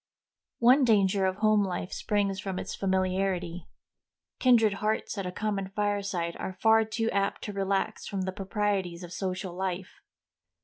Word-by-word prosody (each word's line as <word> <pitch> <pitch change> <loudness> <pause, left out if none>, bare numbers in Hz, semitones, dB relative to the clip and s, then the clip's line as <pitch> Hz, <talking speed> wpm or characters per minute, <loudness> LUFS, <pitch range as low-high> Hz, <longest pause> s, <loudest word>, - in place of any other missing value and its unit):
One 255 +4 +6
danger 200 -4 +3
of 185 - -1
home 215 0 +3
life 185 -1 -3
springs 200 -2 0
from 195 -2 -4
its - - -4
familiarity. 185 -2 -1 0.7
Kindred 230 -5 +5
hearts 215 +2 -1
at 190 - -3
a - - -3
common 200 -1 -2
fireside 200 -4 -1
are 190 - -4
far 225 0 +5
too 225 +1 -1
apt 200 0 -1
to 210 - -5
relax 195 0 -1
from 195 -1 -3
the 190 0 -2
proprieties 195 -3 -2
of 175 0 -8
social 185 -1 -3
life. 185 0 -4
195 Hz, 150 wpm, -28 LUFS, 185-210 Hz, 0.7 s, One